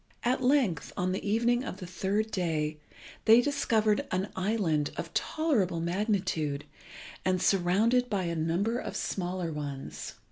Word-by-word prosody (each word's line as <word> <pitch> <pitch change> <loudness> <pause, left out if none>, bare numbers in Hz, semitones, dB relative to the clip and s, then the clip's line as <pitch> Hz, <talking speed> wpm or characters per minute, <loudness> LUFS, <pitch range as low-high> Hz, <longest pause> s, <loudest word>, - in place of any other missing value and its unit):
At 255 +2 +1
length, 250 - +2
on 180 +1 0
the 190 - -3
evening 235 +4 +2
of 195 - -5
the 185 - -7
third 200 +5 -1
day, 155 -4 -1 0.5
they 225 +1 +8
discovered 225 -6 +1
an 185 +2 -1
island 185 -7 +1
of - - -5
tolerable 230 - +1
magnitude, 170 -5 -1 0.6
and 185 -1 +1
surrounded 210 +8 +3
by 200 -3 0
a 170 -1 -2
number 175 +9 0
of - - -5
smaller 180 -3 -2
ones. 145 -2 -6
190 Hz, 140 wpm, -29 LUFS, 170-225 Hz, 0.6 s, they